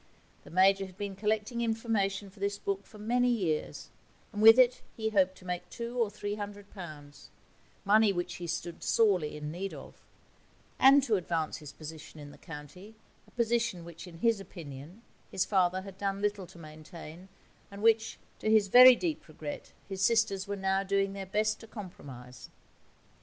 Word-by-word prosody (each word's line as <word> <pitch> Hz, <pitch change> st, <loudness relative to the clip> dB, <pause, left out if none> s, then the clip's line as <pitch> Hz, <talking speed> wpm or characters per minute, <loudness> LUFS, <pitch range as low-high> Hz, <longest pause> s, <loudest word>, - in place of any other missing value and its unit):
The -, -, -14 dB
Major 195 Hz, +2 st, +3 dB
had 185 Hz, 0 st, -16 dB
been 200 Hz, -2 st, -5 dB
collecting 215 Hz, +3 st, -1 dB
information 215 Hz, -4 st, -1 dB
for 200 Hz, -, -19 dB
this 200 Hz, 0 st, -1 dB
book 200 Hz, 0 st, -3 dB
for 215 Hz, -, -14 dB
many 245 Hz, +4 st, +1 dB
years, 180 Hz, -10 st, -2 dB, 0.4 s
and 205 Hz, -, -3 dB
with 225 Hz, +2 st, +9 dB
it 250 Hz, -1 st, +4 dB, 0.2 s
he 220 Hz, -1 st, -1 dB
hoped 190 Hz, -2 st, +2 dB
to 185 Hz, -, -16 dB
make 180 Hz, 0 st, -4 dB
two 235 Hz, 0 st, -6 dB
or 230 Hz, -4 st, +1 dB
three 205 Hz, 0 st, -5 dB
hundred 205 Hz, -1 st, -7 dB
pounds 150 Hz, -6 st, -11 dB, 0.6 s
money 215 Hz, +1 st, +5 dB
which 175 Hz, -1 st, -3 dB
he 175 Hz, -, -6 dB
stood 170 Hz, +1 st, -5 dB
sorely 185 Hz, -10 st, +2 dB
in 150 Hz, 0 st, -5 dB
need 190 Hz, +4 st, -5 dB
of -, -, -13 dB, 0.8 s
and 275 Hz, +1 st, +7 dB
to 225 Hz, -6 st, +2 dB
advance 165 Hz, -3 st, -2 dB
his 150 Hz, -2 st, -10 dB
position 155 Hz, 0 st, -10 dB
in 145 Hz, -1 st, -10 dB
the -, -, -16 dB
county, 165 Hz, +7 st, -11 dB, 0.3 s
a -, -, -21 dB
position 235 Hz, -6 st, 0 dB
which, 170 Hz, +2 st, -10 dB
in 170 Hz, -2 st, -11 dB
his 225 Hz, +3 st, +2 dB
opinion, 170 Hz, -, -10 dB, 0.3 s
his 185 Hz, -, 0 dB
father 185 Hz, -2 st, +1 dB
had 195 Hz, -1 st, -11 dB
done 195 Hz, -1 st, -2 dB
little 205 Hz, -2 st, -2 dB
to 175 Hz, -, -16 dB
maintain, 160 Hz, +2 st, -11 dB, 0.4 s
and 200 Hz, +1 st, -9 dB
which, 225 Hz, 0 st, +3 dB, 0.2 s
to 215 Hz, -, -1 dB
his 215 Hz, -2 st, +4 dB
very 255 Hz, +3 st, +10 dB
deep 320 Hz, +2 st, -3 dB
regret, 155 Hz, -2 st, -8 dB, 0.2 s
his 195 Hz, -1 st, -5 dB
sisters 210 Hz, -3 st, +2 dB
were 200 Hz, -, -2 dB
now 195 Hz, 0 st, 0 dB
doing 195 Hz, 0 st, 0 dB
their 195 Hz, -1 st, -6 dB
best 215 Hz, +2 st, 0 dB
to 225 Hz, -, -12 dB
compromise. 135 Hz, -, -10 dB
195 Hz, 180 wpm, -30 LUFS, 175-220 Hz, 0.8 s, very